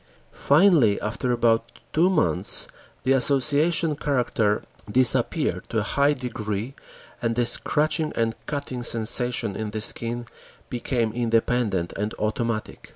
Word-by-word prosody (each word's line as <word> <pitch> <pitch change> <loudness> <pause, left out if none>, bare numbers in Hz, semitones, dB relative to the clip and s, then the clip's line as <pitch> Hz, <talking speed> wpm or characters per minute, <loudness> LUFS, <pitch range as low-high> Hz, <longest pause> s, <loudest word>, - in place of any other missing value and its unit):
Finally, 145 - +4
after 115 +4 -2
about 115 -1 +1 0.2
two 170 +4 +4
months, 155 - +1 0.4
the 130 - +1
association 145 +5 +2
character 120 -7 0 0.3
disappeared 130 +1 +1
to - - -2
a 110 - +1
high 140 +6 +2
degree 115 -3 -4 0.5
and 115 -1 0
the 120 0 +2
scratching 150 +5 +1
and 115 -1 0
cutting 140 -4 -4
sensation 115 -1 +1
in 110 -1 -4
the 110 +1 -4
skin 120 +2 -2 0.5
became 120 -2 -1
independent 115 -5 0
and 105 +2 -3
automatic. 110 +1 -3
120 Hz, 120 wpm, -24 LUFS, 110-140 Hz, 0.5 s, Finally